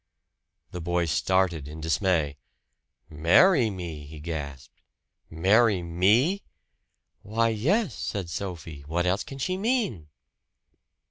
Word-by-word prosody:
The 90 - -6
boy 85 0 0
started 85 -2 +1
in 75 +2 -9
dismay. 80 -2 0 0.7
"Marry 110 - +4
me!" 85 -7 -7
he 75 +1 -10
gasped. 70 -4 -7 0.5
"Marry 95 +4 +3
me!" 105 - +2 0.8
"Why, 115 +2 0
yes!" 150 - +1
said 95 -4 -3
Sophie. 85 -4 -6
"What 85 +3 -1
else 95 +3 +1
can 135 - -9
she 185 +7 -2
mean?" 205 - -1
90 Hz, 110 wpm, -26 LUFS, 80-115 Hz, 0.8 s, Marry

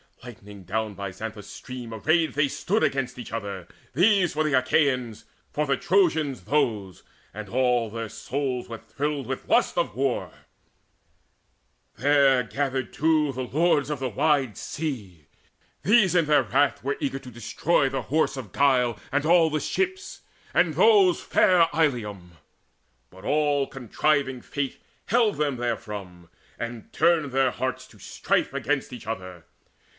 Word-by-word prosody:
Lighting 105 -5 -11
down 110 +3 -2
by 100 0 -6
Xanthus' 105 +1 -8
stream 125 -3 -8
Arrayed 160 +9 +1
they 145 0 +2
stood 205 +9 -1
against 130 -2 -1
each 125 - -8
other, 100 -5 -5 0.3
these 185 - +3
For 155 - 0
the 155 -2 -1
Achaeans, 130 -4 +1 0.3
for 150 - -1
the 135 -1 +1
Trojans 160 -8 +1
those; 105 - -1 0.3
And 105 -1 -7
all 125 -2 +1
their 115 0 -5
souls 130 -1 -3
were 115 -1 -6
thrilled 140 +5 -3
with - - -5
lust - - +2
of - - -1
war: 135 -1 -1 1.6
There 140 -1 +4
gathered 135 +1 -3
too 155 -1 +2
the 130 0 -4
Lords 150 +1 +1
of 150 -3 -3
the 130 -1 -2
wide 140 -2 +1
Sea. 105 - -5 0.6
These 205 0 +4
in 170 -3 +4
their 150 0 +4
wrath 145 -4 +1
were 140 +2 -1
eager 135 -1 -2
to 130 -2 -12
destroy 135 +5 0
The 135 - -3
Horse 155 -1 0
of 120 -7 -7
Guile 125 -5 +2
and 145 +1 0
all 165 0 +5
the 155 0 -1
ships, 375 - -3 0.3
and - - +3
those 415 -6 +5
Fair 180 -4 +4
Ilium. 105 - -1 0.7
But 95 +1 -16
all 145 -2 +2
contriving 135 +1 -1
Fate 140 +1 -4 0.3
Held 225 -2 +2
them 145 -4 0
therefrom, 105 -7 -5 0.3
and 120 -1 -6
turned 160 -4 +2
their 135 -1 +2
hearts 130 0 -4
to 105 - -19
strife - - -1
Against 135 0 -2
each 125 - -10
other. 95 -6 -6
135 Hz, 150 wpm, -25 LUFS, 115-150 Hz, 1.6 s, all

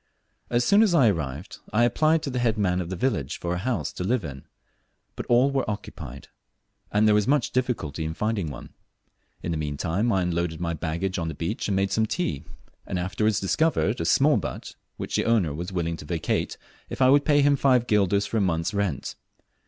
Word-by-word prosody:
As 120 0 +2
soon 200 - +5
as 205 -6 +4
I 130 -8 +6
arrived, 75 +1 -5
I 115 +2 +3
applied 155 +6 +2
to 140 - -3
the 125 - -2
head 115 -2 +1
man 90 -3 +1
of 85 - -5
the 95 - -3
village 90 - -1
for 85 0 -2
a 90 - -2
house 100 - -2
to - - -4
live 110 0 0
in, 70 -2 -8 0.7
but - - -6
all 125 +3 +4
were 135 -5 -1
occupied, 80 - -7 0.6
and 105 +1 +3
there 105 - +5
was 105 -1 +2
much 140 -2 +2
difficulty 115 - -2
in 80 +1 -4
finding 105 -6 -1
one. 70 - -10 0.7
In 85 - -2
the 80 - -2
meantime 80 +9 -1
I 95 -3 +2
unloaded 85 -2 -1
my 85 -1 -2
baggage 85 +4 -2
on 85 - -2
the 80 - -4
beach 85 +7 -3
and 100 - 0
made 95 0 +1
some 110 0 +1
tea, 95 - -2 0.4
and - - -2
afterwards 100 +4 0
discovered 115 - +1
a - - -1
small 135 - +4
but 95 - -5 0.2
which - - -3
the - - 0
owner 105 -10 +2
was 85 +5 -5
willing 85 -2 -2
to - - -10
vacate 80 +1 -2 0.3
if - - -6
I 130 0 +5
would 145 +1 +5
pay 145 -1 +4
him 145 0 +4
five 130 -3 +3
guilders 100 -2 +2
for 115 - -2
a - - +2
month's 85 -2 0
rent. 100 -9 -2
100 Hz, 215 wpm, -25 LUFS, 85-120 Hz, 0.7 s, I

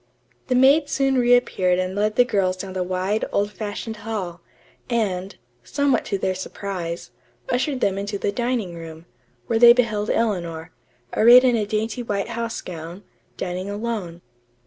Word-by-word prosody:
The 255 - +1
maid 280 +4 +5
soon 270 -1 +1
reappeared 240 -7 +3
and 185 0 -1
led 210 +2 0
the 245 - +5
girls 190 -5 0
down 190 0 -6
the 185 - -2
wide, 185 +4 -1
old 205 +1 0
fashioned 215 +1 -5
hall, 195 -6 -5 0.5
and, 200 -5 -1 0.3
somewhat 285 - +1
to 200 - -1
their 190 -1 -1
surprise, 185 -2 -5 0.4
ushered 260 +1 0
them 195 0 +1
into 200 0 -3
the 200 - -1
dining 235 -4 -2
room, 165 0 -10 0.4
where 225 -1 0
they 235 0 +9
beheld 220 -4 0
Eleanor, 170 -8 -1 0.4
arrayed 240 +3 +8
in 250 -2 +4
a 215 -3 -1
dainty 220 +3 -2
white 205 -2 -2
house 230 -1 -3
gown, 170 +2 -8 0.3
dining 185 +2 -4
alone. 205 -5 -4
205 Hz, 155 wpm, -23 LUFS, 185-235 Hz, 0.5 s, they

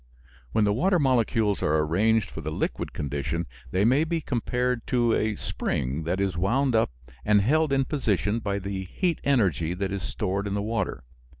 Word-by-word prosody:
When 110 - +2
the 105 0 +3
water 180 - +2
molecules 115 - +2
are 75 +1 +2
arranged 100 +8 +2
for 80 - -6
the 80 - -4
liquid - - -2
condition 70 +4 -3 0.2
they 95 +3 +1
may 130 +6 +4
be 165 +1 -1
compared 125 -3 -1
to 120 -2 +2
a 110 -1 +1
spring 70 -1 -2
that 90 +3 -1
is 95 -3 0
wound 125 +9 +1
up 110 - +3 0.3
and 105 -1 +4
held 150 +8 +2
in 135 -1 +2
position 110 - 0
by 100 -3 -2
the 100 -1 -4
heat 170 - -1
energy 95 - +1
that 95 +1 -2
is 100 -1 -3
stored 100 +1 -2
in 100 - -2
the 100 - 0
water. 110 -3 -2
105 Hz, 185 wpm, -26 LUFS, 95-125 Hz, 0.3 s, may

